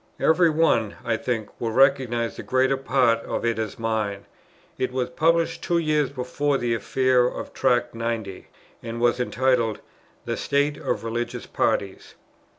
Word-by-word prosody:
Every 170 +1 +4
one, 150 -9 +2
I 115 - +1
think, 110 -2 -3
will 115 -2 -1
recognize 130 -3 +2
the - - -7
greater 130 +1 +2
part 130 -3 +2
of 115 - -4
it 115 -1 0
as 110 -2 -4
mine. 110 -3 -2 0.5
It 130 - -1
was 130 +2 -2
published 165 0 +1
two 170 - 0
years 150 -3 +1
before 140 +2 -1
the 120 -2 -1
affair 125 +3 +2
of - - -6
Tract 120 -2 +1
90, 115 -4 -4 0.3
and 115 0 -6
was 120 +1 +2
entitled 125 -3 +1 0.5
"The - - -2
State 145 +1 0
of - - -2
Religious 115 +1 -3
Parties." 95 -1 -2
125 Hz, 155 wpm, -24 LUFS, 115-135 Hz, 0.5 s, Every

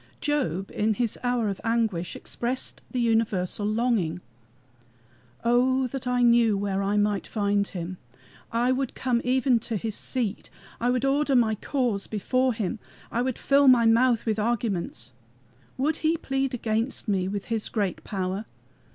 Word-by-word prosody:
Job 240 - -1
in 215 0 +1
his 235 0 -1
hour 245 -3 +1
of 195 -2 -3
anguish 225 -7 0
expressed 250 +2 -4
the 255 - -2
universal 215 -4 +1
longing: 215 -7 0 1.2
"Oh 255 +2 +3
that 255 0 -5
I 250 0 +2
knew 235 -3 +5
where 195 -1 -1
I 200 +1 0
might 205 -1 +1
find 200 -2 0
him! 180 0 -6 0.5
I 240 +2 +2
would 260 -1 -1
come 245 -2 0
even 255 -1 +3
to 225 0 -3
his 220 +2 -3
seat, 225 -2 -3 0.3
I 240 - +1
would 250 +1 +1
order 280 0 +2
my 230 -3 +4
cause 230 -3 -1
before 255 +4 +1
him, 220 +1 -2 0.3
I 235 - 0
would 255 -1 -1
fill 280 0 +4
my 245 -3 +7
mouth 230 +1 +4
with 220 -1 0
arguments. 205 - -2 0.7
Would 295 +4 +1
he 320 +1 +1
plead 270 -3 -1
against 225 +2 -2
me 190 -3 +1
with 200 0 -3
his 220 -2 -1
great 200 -5 -2
power? 190 +1 -3
230 Hz, 155 wpm, -26 LUFS, 205-255 Hz, 1.2 s, my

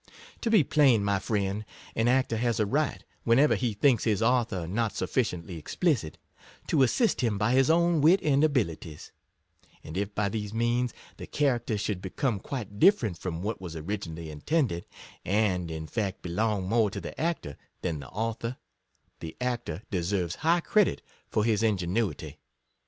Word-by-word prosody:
To 235 - 0
be 215 -7 +5
plain, 130 -7 +4
my 100 -1 +1
friend, 100 0 -1 0.3
an 115 +1 +2
actor 125 -2 +2
has 115 -1 0
a 110 - +3
right, 145 +8 -1 0.2
whenever 130 +6 +4
he 120 -4 0
thinks 120 +1 +3
his 105 -4 +1
author 115 -6 +1
not 105 +2 -1
sufficiently 90 -10 -2
explicit, 100 - -1 0.5
to 150 - +3
assist 210 - +2
him 115 -5 +1
by 105 +3 +1
his 135 +3 +4
own 170 -1 +3
wit 170 +6 +6
and 145 -1 +3
abilities; 85 - -1 0.7
and 80 - -8
if 100 +2 -3
by 105 -1 +1
these 105 +1 -4
means 120 +1 +1 0.3
the - - -8
character 120 -6 0
should 100 -2 -2
become 105 +3 -1
quite 105 -3 -6
different 110 - +4
from 90 -1 -4
what 105 0 -3
was 85 -3 -7
originally 80 -2 -5
intended, 85 - -1 0.4
and 95 -4 +1
in 80 -1 -5
fact 100 +2 -3
be 90 - -5
long 105 0 0
more 110 0 +3
to - - -5
the - - -7
actor 160 - -2 0.3
than 85 -5 -2
the 70 - -9
author, 115 +3 -3 0.6
the 80 -1 -8
actor 120 -8 -3
deserves 90 -2 -1
high 170 +2 +3
credit 210 +3 +2 0.3
for 105 - +1
his 110 -2 +2
ingenuity. 100 -4 -1
110 Hz, 165 wpm, -28 LUFS, 95-125 Hz, 0.7 s, wit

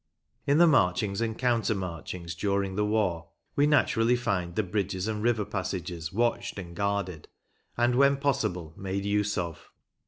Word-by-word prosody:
In 140 +1 +4
the 175 - +7
marchings 105 - +2
and 115 -1 -1
counter 120 -3 +1
marchings 85 -1 -5
during 100 -1 -1
the 105 - +1
war 100 -6 0 0.3
we 145 +1 +4
naturally 125 -5 +3
find 95 -8 -2
the 110 - +1
bridges 95 0 -2
and 105 -1 -2
river 110 -2 +1
passages 90 -5 -4
watched 120 +2 0
and 85 -3 -7
guarded, 100 -4 -2 0.5
and, 120 +1 +3
when 140 +2 +4
possible, 130 - -1
made 95 +1 -3
use 105 0 +1
of. 85 -4 -4
100 Hz, 155 wpm, -28 LUFS, 90-120 Hz, 0.5 s, the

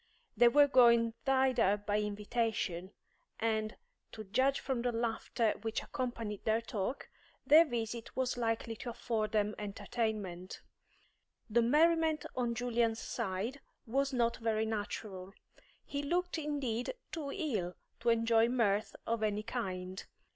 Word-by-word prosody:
They 240 +2 +6
were 285 +4 +6
going 235 -4 +5
thither 260 -6 +3
by 205 0 -1
invitation, 210 -3 -2 0.5
and, 220 -1 0 0.4
to 215 - -7
judge 260 +7 +2
from 265 -3 -2
the 245 0 0
laughter 230 -1 0
which 225 -1 -2
accompanied 235 -6 -4
their 220 +1 +2
talk, 230 +2 -4 0.4
their 315 +3 +8
visit 235 -3 -4
was 260 -1 0
likely 230 -1 -1
to 245 - -6
afford 225 -2 -2
them 210 -1 +1
entertainment. 205 -3 -3 0.9
The 235 +2 +4
merriment 315 +5 +3
on 240 -2 0
Julian's 235 -2 +1
side 225 +6 -3 0.2
was 275 +4 0
not 235 -2 +1
very 220 -2 0
natural; 205 -3 -4 0.5
he 285 - -3
looked 350 +3 -1
indeed 280 - -2 0.2
too 295 -4 -4
ill 220 - -2 0.2
to 235 +1 +1
enjoy 230 0 +4
mirth 215 -4 +1
of 230 -1 -1
any 210 -1 0
kind. 190 -5 -4
230 Hz, 130 wpm, -33 LUFS, 215-255 Hz, 0.9 s, their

